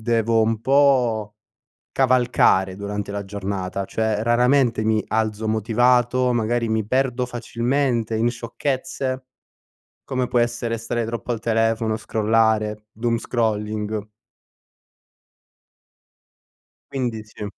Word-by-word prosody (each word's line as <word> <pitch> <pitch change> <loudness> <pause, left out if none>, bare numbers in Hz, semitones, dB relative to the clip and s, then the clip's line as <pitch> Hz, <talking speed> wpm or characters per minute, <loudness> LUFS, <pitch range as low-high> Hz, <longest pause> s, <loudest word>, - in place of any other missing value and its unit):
devo 115 0 +2
un 110 0 0
po' 125 -6 +2 0.6
cavalcare 120 -7 +3
durante 100 0 -4
la 100 0 -3
giornata. 100 -1 -4
Cioè 110 0 -1
raramente 120 0 +3
mi 110 0 +2
alzo 110 0 -1
motivato, 120 +3 +2
magari 115 0 0
mi 110 -1 0
perdo 125 +1 0
facilmente 120 -1 -1
in 115 +2 +2
sciocchezze. 130 +2 -3 0.8
Come 130 -1 -2
può 120 - +1
essere 120 -1 -1
stare 115 0 -2
troppo 115 +1 -4
al 115 - -2
telefono, 115 0 +1
scrollare, 110 -1 +1
doomscrolling 110 -2 -2 2.8
quindi, 120 -5 -2
sì 105 -1 -9
115 Hz, 100 wpm, -22 LUFS, 110-120 Hz, 2.8 s, cavalcare